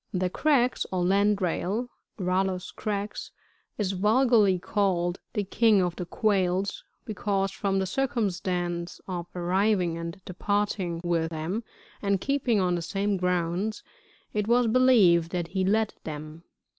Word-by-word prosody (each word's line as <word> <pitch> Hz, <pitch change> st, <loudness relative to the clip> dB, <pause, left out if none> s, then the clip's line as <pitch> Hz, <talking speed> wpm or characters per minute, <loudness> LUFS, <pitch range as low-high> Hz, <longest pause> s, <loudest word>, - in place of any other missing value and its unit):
] -, -, -49 dB
61. 185 Hz, -, 0 dB
The 185 Hz, 0 st, +1 dB
Crex, 260 Hz, -3 st, +2 dB
or 185 Hz, -1 st, 0 dB
lAind 200 Hz, +2 st, +3 dB
Hail, 195 Hz, +6 st, -1 dB, 0.2 s
— -, -, -52 dB
Rallus 185 Hz, 0 st, -1 dB
crex,— 205 Hz, 0 st, -4 dB, 0.5 s
is 200 Hz, -3 st, 0 dB
vulgarly 210 Hz, 0 st, +3 dB
called 180 Hz, -2 st, 0 dB
the 210 Hz, -3 st, 0 dB
King 215 Hz, +1 st, +3 dB
of 180 Hz, -2 st, 0 dB
the 180 Hz, -, -5 dB
Q,uails, 195 Hz, -2 st, 0 dB, 0.2 s
because, 195 Hz, -2 st, -1 dB
from 195 Hz, -1 st, -1 dB
the 190 Hz, -, +1 dB
circumstance 180 Hz, -7 st, -2 dB
of 175 Hz, -2 st, -4 dB
arriving 180 Hz, -1 st, +1 dB
and 170 Hz, +2 st, -6 dB
departing 190 Hz, -2 st, -1 dB
with 165 Hz, -2 st, 0 dB
them, 165 Hz, +8 st, -3 dB, 0.4 s
and 200 Hz, -1 st, +1 dB
keeping 270 Hz, -4 st, +1 dB
on 180 Hz, -1 st, +1 dB
the 175 Hz, -, -1 dB
same 200 Hz, +4 st, -1 dB
grounds, 180 Hz, +3 st, -1 dB, 0.5 s
it 210 Hz, -1 st, -1 dB
was 240 Hz, +1 st, +4 dB
believed 220 Hz, -9 st, +5 dB
that 175 Hz, -2 st, -3 dB
he 190 Hz, +1 st, -1 dB
led 215 Hz, +3 st, +1 dB
them. 155 Hz, +2 st, -8 dB
190 Hz, 145 wpm, -27 LUFS, 175-210 Hz, 0.5 s, believed